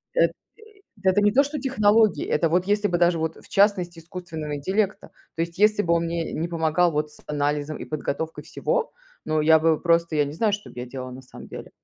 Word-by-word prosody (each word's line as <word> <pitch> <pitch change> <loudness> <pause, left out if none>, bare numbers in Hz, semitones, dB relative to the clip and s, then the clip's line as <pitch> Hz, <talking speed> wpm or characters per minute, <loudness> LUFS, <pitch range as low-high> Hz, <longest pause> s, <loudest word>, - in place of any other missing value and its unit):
Эт - - +4
э, - - -24 0.7
это 190 +2 +4
не 205 0 +3
то, 275 - +5
что 290 +1 -4
технологии, 220 -4 +3
это 165 - +1
вот 180 +3 +1
если 205 +1 +2
бы 175 -2 0
даже 175 -1 +3
вот, 160 0 -2
в - - -17
частности, 185 -4 +2
искусственного 165 -3 -6
интеллекта. 195 +7 -1 0.3
То 165 - 0
есть 170 +2 -6
если 210 0 +4
бы 170 0 +2
он 170 - +1
мне 165 -1 -3
не 165 +2 -2
помогал 165 +1 +1
вот 150 0 -1
с - - -17
анализом 145 +1 -1
и - - -6
подготовкой 155 +1 -4
всего, - - -2 0.3
ну 155 0 0
я 160 +1 +6
бы 160 -1 +2
просто, 170 -1 +2
я 150 - +3
не 145 - -6
знаю, 210 +6 +1
что 205 +1 -4
б - - -12
я 125 - -5
делала 130 0 -7
на 130 +1 -10
самом 125 - -13
деле. - - -9
170 Hz, 230 wpm, -24 LUFS, 155-205 Hz, 0.7 s, я